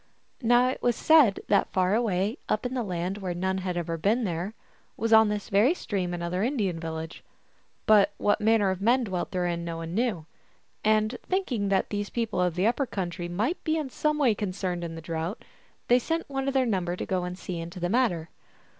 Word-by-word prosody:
Now 240 +1 +4
it 260 - -4
was 240 -1 +2
said 300 -11 +5
that 200 -1 +2
far 185 +1 +2
away 215 0 0
up 215 - 0
in 250 - -2
the 255 - -1
land 185 -1 -3
where 185 -3 -3
none 190 +2 -1
had 180 -1 -3
ever 165 -1 -3
been 220 +9 +2
there 180 +2 -3 0.4
was 225 +1 +1
on 220 -1 +7
this 210 -1 -3
very 220 - +4
stream 190 - -3
another 175 +1 -2
Indian 210 - 0
village; 160 0 -6 0.6
but 210 -3 +5
what 205 - +1
manner 210 -2 +3
of 190 0 -4
men 245 +5 +3
dwelt 185 -5 -3
therein 175 -2 -1
no 165 -1 -4
one 165 0 -6
knew. 210 -7 -1 0.6
And 215 +2 +2
thinking 260 - 0
that 195 -1 +1
these 205 0 -2
people 225 -5 -1
of 180 -2 +1
the 180 +2 +1
upper 245 +4 +1
country 175 -3 -4
might 220 - -1
be 315 0 +1
in 295 -4 -3
some 300 +3 0
way 265 -7 +4
concerned 185 -3 -3
in 165 -1 -5
the 165 - -7
drought, 165 +5 -4 0.4
they 245 +1 +5
sent 325 +6 -2
one 270 -1 -3
of 275 - -1
their 260 -1 +3
num 190 -6 0
ber 175 0 -2
to - - -4
go 185 -1 -1
and 180 0 -5
see 180 -2 -5
into 170 +2 -7
the 175 - 0
matter. 180 -7 +1
200 Hz, 215 wpm, -27 LUFS, 175-235 Hz, 0.6 s, on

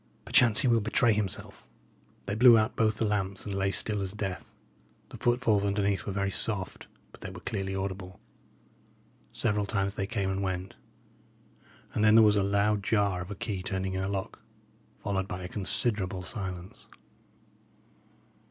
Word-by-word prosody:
"Perchance 115 -4 +4
he 130 - +2
will 115 -2 +4
betray 110 +2 +3
himself." 105 -3 -3 0.6
They - - -2
blew 120 +2 +7
out 110 0 +1
both 110 -1 +1
the 115 - 0
lamps 100 -2 -1
and 100 - -4
lay 95 0 0
still 105 +1 0
as 95 0 -3
death. 95 -3 -5 0.6
The - - -9
footfalls 120 -4 +2
underneath 100 -2 0
were - - -1
very 100 0 -1
soft, 95 -3 -2 0.2
but - - -17
they - - -6
were - - -9
clearly 95 0 -3
audible. 95 -1 -5 1.1
Several 105 -1 -1
times 100 -2 0
they 100 -1 -3
came 100 -3 -1
and 95 +1 -2
went; 95 -1 -3 1.2
and 105 - 0
then 110 0 +6
there 115 - +8
was 105 0 +5
a 100 - +3
loud 100 +1 +1
jar 100 -3 +1
of 90 - -7
a 100 - -5
key 95 -1 -4
turning 95 0 -3
in 95 - -2
a 95 - -2
lock, 95 -1 -4 0.6
followed 95 -2 -2
by 90 -2 -5
a - - -4
considerable 95 -1 -1
silence. 90 -2 -6
100 Hz, 170 wpm, -29 LUFS, 95-105 Hz, 1.2 s, there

